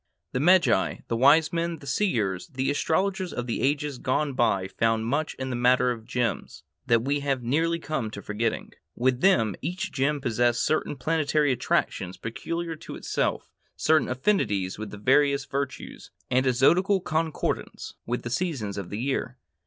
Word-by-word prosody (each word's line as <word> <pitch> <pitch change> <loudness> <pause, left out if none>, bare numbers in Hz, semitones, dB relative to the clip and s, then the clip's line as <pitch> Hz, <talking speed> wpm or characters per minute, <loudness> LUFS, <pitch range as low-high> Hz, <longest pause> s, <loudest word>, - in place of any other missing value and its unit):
The 125 - -1
magi, 180 +4 +3
the 115 - 0
wise 145 +7 +5
men, 170 0 -1
the 145 - -14
seers, 115 - 0
the 135 -2 -1
astrologers 185 +5 0
of 125 - -4
the 120 - -2
ages 145 -1 0
gone 140 +2 0
by 100 -7 +1
found 115 +2 0
much 145 +6 -1
in 130 0 -4
the - - -2
matter 125 +1 +3
of 115 -2 -6
gems 115 -5 -3 0.2
that 115 -2 +3
we 140 +2 0
have 135 -3 -1
nearly 165 +7 +1
come 155 -8 -3
to 100 -1 -8
forgetting. 110 +2 -2 0.2
With 125 +1 +1
them 115 - +4
each 185 +1 -3
gem 145 +2 0
possessed 120 -2 +1
certain 155 - 0
planetary 150 +1 +1
attractions 95 -6 -1
peculiar 165 +8 -4
to - - -9
itself, - - -2 0.2
certain 155 -1 +2
affinities 115 - 0
with 110 - -5
the 105 - -9
various 140 +5 +3
virtues, 135 -1 -5 0.2
and 130 +1 +3
a 130 - +3
zodiacal 185 +10 +3
concordance 160 -1 -2
with 120 +1 -2
the 120 - -5
seasons 125 - -2
of 95 - -7
the 100 - -5
year. 130 -1 -2
135 Hz, 170 wpm, -26 LUFS, 120-155 Hz, 0.2 s, wise